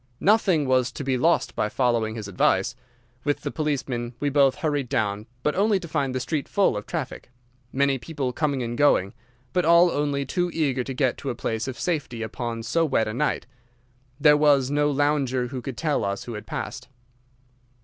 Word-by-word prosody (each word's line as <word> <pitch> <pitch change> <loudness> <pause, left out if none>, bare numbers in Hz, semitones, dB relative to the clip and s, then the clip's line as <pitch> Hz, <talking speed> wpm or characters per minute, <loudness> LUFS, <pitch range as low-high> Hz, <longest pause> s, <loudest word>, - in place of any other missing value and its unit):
"Nothing 190 -7 +3
was 130 -1 +2
to - - -5
be 135 -1 0
lost 165 +7 +2
by 105 - 0
following 115 -3 0
his 110 -3 -6
advice. 100 +4 +1 0.5
With 145 -1 0
the - - -3
policeman 135 -6 -2
we 145 -1 0
both 135 -2 +4
hurried 145 -5 -1
down, 105 0 -1 0.2
but 150 - +1
only 205 0 +2
to 175 - -8
find 140 -4 -1
the - - 0
street 140 +3 -2
full 200 - +2
of 105 - -5
traffic, - - -5 0.4
many 140 0 +1
people 135 0 -3
coming 140 -4 0
and 120 0 -3
going, 110 -9 +3 0.4
but 180 - +2
all 170 +2 +6
only 145 -1 -1
too 180 +3 -1
eager 135 -5 +1
to 135 +1 -6
get 130 -2 +1
to 140 - -4
a 120 - -2
place 115 0 -3
of 130 - -5
safety 140 -9 -2
upon 115 0 -4
so 165 +8 +1
wet 130 -8 +1
a 110 - -3
night. 150 +6 -1 0.7
There 150 0 +6
was 145 -3 +3
no 145 0 +2
lounger 140 -3 +1
who 130 -1 -5
could 130 -1 -6
tell 155 -3 0
us 100 0 -2
who 120 - -7
had 105 - -8
passed. - - -5
135 Hz, 195 wpm, -25 LUFS, 120-150 Hz, 0.7 s, all